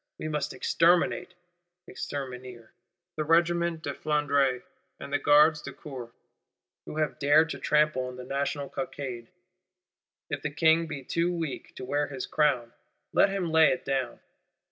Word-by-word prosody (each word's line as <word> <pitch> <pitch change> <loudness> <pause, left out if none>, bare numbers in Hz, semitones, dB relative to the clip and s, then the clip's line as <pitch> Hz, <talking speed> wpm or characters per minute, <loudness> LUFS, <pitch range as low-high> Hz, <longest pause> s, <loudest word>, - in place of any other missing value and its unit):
We - - -5
must 150 -1 -2
exterminate 175 +5 +2 0.5
(exterminer) 125 -4 -7 0.5
the 155 - 0
Regiment 170 +1 +2
de 140 - -3
Flandre 140 -4 +1 0.4
and 140 - -8
the 145 - +2
Gardes 150 +1 +5
du - - -8
Corps, 125 -5 -9 0.8
who - - -6
have 155 -1 -1
dared 155 +3 +4
to - - -5
trample 150 -4 +2
on 125 - -7
the 125 - -8
National 140 +2 -2
Cockade. 130 -3 -5 1.0
If 145 - -2
the 150 - -2
King 160 +2 +3
be 150 -3 -6
too 170 +6 0
weak 165 -5 -5
to 130 - -7
wear 145 +2 0
his 135 -3 -5
crown, 130 -6 +1 0.4
let - - +5
him 190 -4 -2
lay 160 -1 +6
it 175 - -1
down. 130 -3 -2
145 Hz, 150 wpm, -28 LUFS, 130-160 Hz, 1.0 s, lay